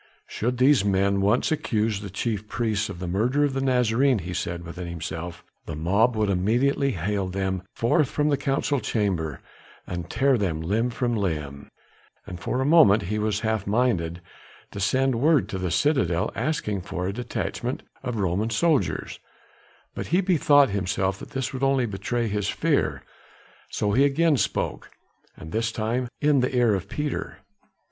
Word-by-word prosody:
"Should 125 +3 -2
these 130 -2 +5
men 100 0 +2
once 105 +9 +2
accuse 110 -8 0
the 100 - -6
chief 105 +1 -3
priests 110 -3 -1
of 95 - -6
the 90 0 -5
murder 120 +11 +1
of 145 -2 +1
the 135 - -1
Nazarene," 125 0 +2
he 90 -2 -5
said 85 0 -3
within 85 +1 -7
himself, 85 0 -6 0.2
"the 80 - -4
mob 100 +10 +2
would 110 -1 +1
immediately 125 +9 +1
hale 100 +2 -1
them 95 0 -2
forth 130 +5 +2
from 150 0 0
the 145 - +3
council 135 +1 0
chamber 90 - -1 0.4
and 85 -2 -5
tear 135 -2 +2
them 85 -6 -1
limb 105 +9 0
from 120 0 -1
limb." 75 -8 -3 0.6
And 90 -3 -8
for 125 - -2
a - - 0
moment 140 -10 +6
he 105 - 0
was 105 -1 0
half 110 -3 -1
minded 100 -7 0 0.5
to - - -7
send 130 +4 +1
word 155 -1 +4
to 95 - -4
the 90 -1 -2
citadel 90 - +1
asking 105 -11 -2
for 90 0 -4
a 95 - -2
detachment 125 +1 -4 0.2
of 125 -3 -4
Roman 100 +2 0
soldiers, 150 +6 0 0.7
but - - -5
he 175 - +2
bethought 145 - +4
himself 95 0 -1
that - - -10
this 135 -1 -3
would 130 - -5
only 135 -2 +2
betray 115 +3 -2
his 105 -1 -1
fear. - - 0 0.7
So 105 - -1
he 130 +7 +4
again 145 +2 +3
spoke, - - -2 0.5
and 80 - -10
this 115 +3 0
time 115 +3 -1
in 145 -2 +3
the 125 +1 0
ear 120 -3 +4
of 95 0 -3
Peter. 150 +2 -3
110 Hz, 170 wpm, -25 LUFS, 95-130 Hz, 0.7 s, moment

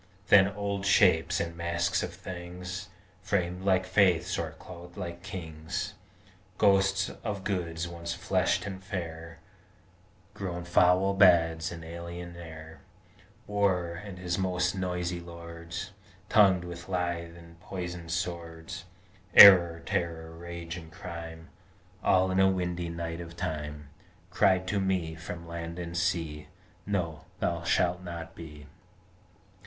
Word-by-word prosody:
Then 95 -1 +8
old 100 0 -3
Shapes 90 -5 +4
and 85 0 -3
Masks 85 +1 0
of 90 - -3
Things, 90 +1 -7 0.3
Framed 90 -2 -1
like 95 -1 +3
Faiths 95 -3 +3
or - - -3
clothed 85 0 -12
like 85 -1 -5
Kings, 80 -5 -5 0.6
Ghosts 95 -1 +3
of 105 -4 -3
Goods 85 -4 -2
once 85 0 -5
fleshed 95 +2 +1
and 95 -2 -6
fair, 85 -4 -6 1.0
Grown 90 -4 -4
foul 90 +2 +4
Bads 85 -4 +4
in 85 -1 -8
alien 85 +1 -7
air 80 -1 -10 0.6
War, 95 -4 +1
and 100 -3 -8
his 90 0 -2
most 90 -1 +1
noisy 90 -2 -2
lords, 85 +2 -8 0.4
Tongued 95 -4 +5
with 85 0 -8
lithe 85 -2 -2
and 85 0 -15
poisoned 90 -2 -6
swords 85 +1 -4 0.5
Error, 85 -4 +10
Terror, 80 -1 -2
Rage, 85 0 -7
and 80 -1 -10
Crime, 80 0 -8 0.5
All 95 0 +4
in 95 - +1
a 95 0 +6
windy 90 -2 -2
night 85 0 -4
of 85 0 -9
time 75 -4 -4 0.4
Cried 95 0 +3
to 100 - +1
me 95 -4 0
from 85 +1 -8
land 85 0 -6
and 85 -1 -5
sea, 80 -4 -1 0.4
_No! 85 -6 -2
Thou 85 -1 0
shalt 85 +1 +1
not 85 -2 -7
be! 75 -3 -10
85 Hz, 125 wpm, -29 LUFS, 85-95 Hz, 1.0 s, Error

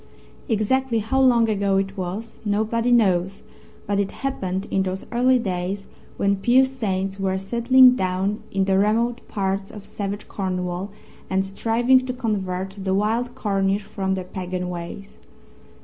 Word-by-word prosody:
Exactly 235 +3 +1
how 245 +5 +1
long 240 -3 +5
ago 200 -2 +1
it 195 0 -1
was 195 +4 -5
nobody 220 +3 0
knows, 195 -3 +2 0.4
but 200 0 0
it 200 -1 0
happened 195 -8 -3
in 190 - +2
those 190 0 -3
early 255 +2 +4
days 195 -2 -3 0.3
when 200 0 +2
pious 260 +5 +3
saints 195 -4 -2
were 190 -1 0
settling 245 +6 +5
down 190 +1 -1
in 195 -1 0
the 190 0 +2
remote 230 +4 +1
parts 195 -1 -2
of 205 -2 -10
savage 200 0 -5
Cornwall 180 0 -3 0.4
and 190 0 +1
striving 235 +6 +2
to 255 - -2
convert 195 -6 -3
the 190 0 +1
wild 225 +4 0
Cornish 195 -1 0
from 195 -2 -2
their 185 - -4
pagan 180 -1 -4
ways. 175 +3 -8
200 Hz, 150 wpm, -23 LUFS, 190-230 Hz, 0.4 s, long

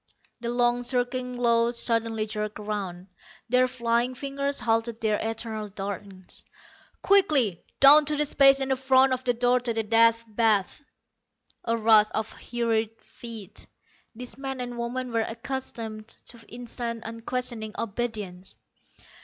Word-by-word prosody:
The 235 0 -4
long 240 0 +2
circling 250 0 -2
row 235 -1 +3
suddenly 230 -2 +1
jerked 210 0 -4
around; 200 -4 -5 0.4
their 255 +1 +4
flying 240 0 0
fingers 280 +1 -2
halted 225 0 0
their 215 -2 +1
eternal 220 -1 -3
dartings. 195 -1 -8 0.6
"Quickly, 295 - +3 0.2
down 295 +2 +8
to 300 +1 +1
the 300 - +2
space 275 -1 +5
in 265 0 +1
front 265 0 +4
of 255 0 -3
the 245 -1 +2
door 245 +1 +3
to 240 -1 -3
the 225 - 0
Death 230 +1 +4
Bath." 215 +2 +1 0.8
A 230 0 +1
rush 215 -1 +5
of 220 0 -2
hurried 225 -2 -2
feet. 225 -4 -9 0.5
These 250 +3 -7
men 270 -1 -4
and 245 -1 -5
women 245 +1 -3
were 230 -1 +1
accustomed 225 -2 -5
to 230 0 -6
instant, 235 -1 -5
unquestioning 230 -1 -4
obedience. 210 -5 -5
235 Hz, 135 wpm, -26 LUFS, 220-250 Hz, 0.8 s, down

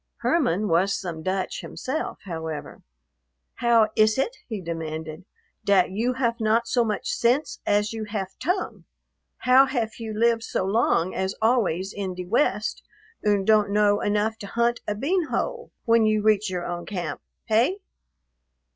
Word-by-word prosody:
Herman 215 - +1
was 190 +3 +2
some 170 -4 -5
Dutch 185 +2 -2
himself, 300 +5 -4
however. 160 -5 -6 0.8
"How 230 -2 +3
iss 215 0 +4
it," 450 - 0
he 220 -4 -4
demanded, 160 -1 -5 0.4
"dat 195 -2 +3
you 230 +6 0
haf 235 -2 -1
not 225 +1 +2
so 240 0 +2
much 215 -2 -2
sense 270 -5 +1
as 210 +2 +2
you 220 -1 -4
haf 205 -3 -3
tongue? 360 +4 -2 0.5
How 260 +2 +5
haf 240 -5 -2
you 220 -2 -5
lived 230 0 +3
so 190 - -2
long 195 -4 +1
as 190 +1 -2
always 205 -5 +1
in 190 -2 -4
de 180 0 -5
West 215 +1 0 0.4
und 205 -2 +2
don't 215 -1 +4
know 205 0 +3
enough 210 +2 0
to 200 - -7
hunt 235 +3 +1
a 210 - -1
bean 330 - 0
hole 475 - -3
when 230 -1 +4
you 215 -1 +1
reach 215 -1 +3
your 180 -1 -3
own 175 0 -5
camp. 185 -4 -4 0.2
Hey?" 235 - +2
215 Hz, 155 wpm, -25 LUFS, 190-235 Hz, 0.8 s, How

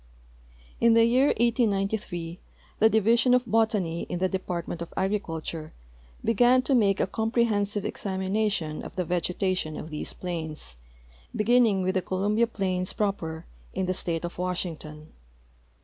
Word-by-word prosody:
In 230 -1 +5
the 230 - +6
}'ear 250 +4 +4
1893 200 - 0 0.4
the 220 - +6
Division 230 +3 +4
of 250 0 +1
Botau}^ 210 -6 +1
in 175 - -2
the 185 +1 +1
Department 175 -2 -4
of 170 - -6
Agriculture 165 -5 -3 0.5
began 245 +3 +4
to 275 - +1
make 205 -6 +3
a - - +3
comprehensive 215 -1 0
examination 190 -4 -1
of - - -9
the 180 - -1
vegetation 180 -1 -1
of 155 - -7
these 150 - -3
ifiains, 160 - -5 0.6
beginning 215 -3 +3
with 185 +1 +1
the 190 - +1
Columbia 205 +5 +1
plains 185 -4 -1
proper, 170 -6 -2 0.3
in 190 - 0
the 185 - 0
state 170 -2 -2
of 175 - -7
Washington. 165 -4 -4
190 Hz, 135 wpm, -27 LUFS, 175-220 Hz, 0.6 s, the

